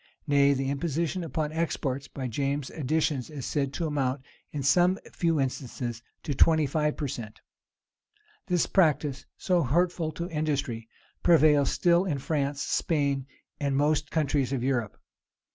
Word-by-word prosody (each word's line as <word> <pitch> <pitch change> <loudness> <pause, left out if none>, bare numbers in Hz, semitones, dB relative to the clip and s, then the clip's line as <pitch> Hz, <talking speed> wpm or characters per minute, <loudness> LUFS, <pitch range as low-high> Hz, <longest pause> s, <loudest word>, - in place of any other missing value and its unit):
Nay, 140 -1 +4
the 135 0 -1
imposition 165 +4 -1
upon 155 -1 -2
exports, 140 -4 -2
by 130 -2 -5
James's 140 +3 -2
additions, 150 -2 0
is 145 -5 -6
said 140 -3 -1
to 170 - -2
amount, 140 -3 -1 0.3
in 145 -2 -4
some 175 +7 +4 0.2
few 165 -3 +1
instances, 125 -3 -3 0.2
to 150 - -2
twenty 155 +3 +4
five 150 +2 0
per 145 - -2
cent 110 -4 -7 1.1
This 180 -2 +2
practice, 150 -6 +1
so 180 -2 +2
hurtful 165 +3 +1
to 170 +3 -4
industry, 140 -7 -2 0.3
prevails 150 -5 +5
still 175 +1 +3
in 155 -7 -1
France, 140 0 -1
Spain, 140 -4 0 0.3
and 140 -2 0
most 150 0 +1
countries 145 -4 0
of 130 -3 -1
Europe. 120 -5 -1
145 Hz, 145 wpm, -28 LUFS, 135-160 Hz, 1.1 s, prevails